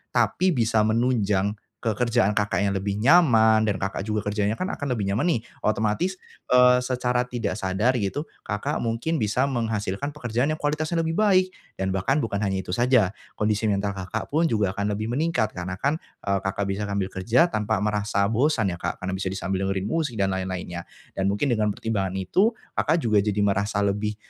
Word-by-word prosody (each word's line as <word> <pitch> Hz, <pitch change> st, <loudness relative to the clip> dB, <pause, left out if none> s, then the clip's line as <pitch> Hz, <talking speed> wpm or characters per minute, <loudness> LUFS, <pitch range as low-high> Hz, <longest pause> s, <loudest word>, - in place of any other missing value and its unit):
tapi 185 Hz, -3 st, +2 dB
bisa 115 Hz, -2 st, +2 dB
menunjang 105 Hz, -4 st, +1 dB, 0.2 s
ke 115 Hz, -, +1 dB
kerjaan 120 Hz, -4 st, +2 dB
Kakak 100 Hz, -2 st, 0 dB
yang 100 Hz, -, +1 dB
lebih 100 Hz, +1 st, -2 dB
nyaman, 110 Hz, -7 st, +5 dB
dan 105 Hz, -, +1 dB
Kakak 95 Hz, +1 st, -3 dB
juga 105 Hz, -2 st, -1 dB
kerjanya 105 Hz, +1 st, 0 dB
kan 185 Hz, +2 st, -2 dB
akan 140 Hz, -3 st, -2 dB
lebih 105 Hz, -, -2 dB
nyaman 100 Hz, -, 0 dB
nih, -, -, -7 dB, 0.3 s
otomatis, 110 Hz, -, 0 dB, 0.4 s
eee, 125 Hz, 0 st, +6 dB
secara 125 Hz, -1 st, 0 dB
tidak 115 Hz, -5 st, -3 dB
sadar 95 Hz, +6 st, +1 dB
gitu, 105 Hz, +9 st, -2 dB, 0.2 s
Kakak 105 Hz, 0 st, -2 dB
mungkin 120 Hz, +8 st, -1 dB
bisa 110 Hz, +4 st, +1 dB
menghasilkan 115 Hz, -1 st, -2 dB
pekerjaan 120 Hz, -1 st, -1 dB
yang 155 Hz, -, 0 dB
kualitasnya 155 Hz, +3 st, -1 dB
lebih 160 Hz, -, -1 dB
baik. 185 Hz, -3 st, +3 dB, 0.3 s
Dan 95 Hz, 0 st, 0 dB
bahkan 95 Hz, +10 st, +1 dB
bukan 100 Hz, -3 st, -2 dB
hanya 100 Hz, -2 st, 0 dB
itu 90 Hz, -1 st, -6 dB
saja, 120 Hz, -6 st, +3 dB, 0.3 s
kondisi 105 Hz, +1 st, +1 dB
mental 100 Hz, 0 st, 0 dB
Kakak 95 Hz, +5 st, -5 dB
pun 165 Hz, +3 st, +3 dB
juga 105 Hz, -8 st, +1 dB
akan 100 Hz, +1 st, -1 dB
lebih 110 Hz, +3 st, -3 dB
meningkat 125 Hz, -6 st, 0 dB
karena 90 Hz, +1 st, -4 dB
kan, 150 Hz, +4 st, 0 dB, 0.2 s
eee, 100 Hz, -1 st, +1 dB
Kakak 100 Hz, +1 st, -1 dB
bisa 100 Hz, +2 st, -3 dB
ngambil 100 Hz, -2 st, -1 dB
kerja 125 Hz, -, +3 dB
tanpa 105 Hz, -4 st, 0 dB
merasa 105 Hz, -1 st, 0 dB
bosan 115 Hz, -5 st, +2 dB
ya 85 Hz, -, -6 dB
Kak, 85 Hz, +1 st, -4 dB
karena 95 Hz, -, -2 dB
bisa 95 Hz, -, -3 dB
disambi 95 Hz, 0 st, -2 dB
dengerin 95 Hz, 0 st, -1 dB
musik 150 Hz, -4 st, -1 dB
dan 95 Hz, -1 st, +2 dB
lain-lainnya. 90 Hz, -2 st, -4 dB, 0.2 s
Dan 95 Hz, -, -1 dB
mungkin 105 Hz, +8 st, 0 dB
dengan 110 Hz, -2 st, +1 dB
pertimbangan 100 Hz, -4 st, -2 dB
itu, 190 Hz, -, +2 dB, 0.2 s
Kakak 155 Hz, -, +2 dB
juga 110 Hz, -3 st, +3 dB
jadi 105 Hz, 0 st, 0 dB
merasa 100 Hz, 0 st, +1 dB
lebih, 105 Hz, +1 st, -1 dB
105 Hz, 190 wpm, -25 LUFS, 100-125 Hz, 0.4 s, eee